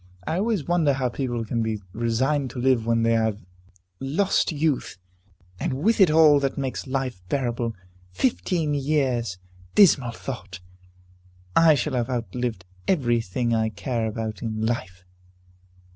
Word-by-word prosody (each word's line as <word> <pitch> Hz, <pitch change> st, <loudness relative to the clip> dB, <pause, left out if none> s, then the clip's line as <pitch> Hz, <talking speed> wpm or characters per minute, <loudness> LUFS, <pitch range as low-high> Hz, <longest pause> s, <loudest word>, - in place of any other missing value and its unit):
I 160 Hz, -, -1 dB
always 205 Hz, -6 st, 0 dB
wonder 170 Hz, -5 st, +3 dB
how 130 Hz, -2 st, 0 dB
people 120 Hz, -2 st, -3 dB
can 115 Hz, +1 st, -1 dB
be 110 Hz, -1 st, -1 dB
resigned 130 Hz, +5 st, 0 dB
to 125 Hz, -, -7 dB
live, 125 Hz, -3 st, +2 dB
when 115 Hz, 0 st, +2 dB
they 115 Hz, -, +3 dB
have 110 Hz, -2 st, +1 dB, 0.6 s
lost 170 Hz, +9 st, +1 dB
youth, 150 Hz, -7 st, -1 dB, 0.6 s
and -, -, -1 dB
with 215 Hz, -, +2 dB
it 185 Hz, -, +7 dB
all 155 Hz, -2 st, +6 dB
that 135 Hz, -1 st, -2 dB
makes 135 Hz, 0 st, -3 dB
life 130 Hz, -6 st, -3 dB
bearable! 120 Hz, -4 st, -1 dB, 0.3 s
Fifteen 100 Hz, -, 0 dB
years! 135 Hz, -8 st, 0 dB, 0.4 s
Dismal 140 Hz, -, +6 dB
thought! 105 Hz, -7 st, -7 dB, 1.0 s
I 165 Hz, -2 st, +6 dB
shall 140 Hz, +2 st, -2 dB
have 125 Hz, 0 st, -1 dB
outlived 120 Hz, -4 st, -3 dB, 0.2 s
every 120 Hz, -10 st, +2 dB
thing 115 Hz, +4 st, -1 dB
I 110 Hz, -1 st, +1 dB
care 115 Hz, +1 st, -2 dB
about 110 Hz, -1 st, -4 dB
in 110 Hz, -1 st, -2 dB
life!" 95 Hz, -6 st, -3 dB
125 Hz, 145 wpm, -24 LUFS, 115-145 Hz, 1.0 s, it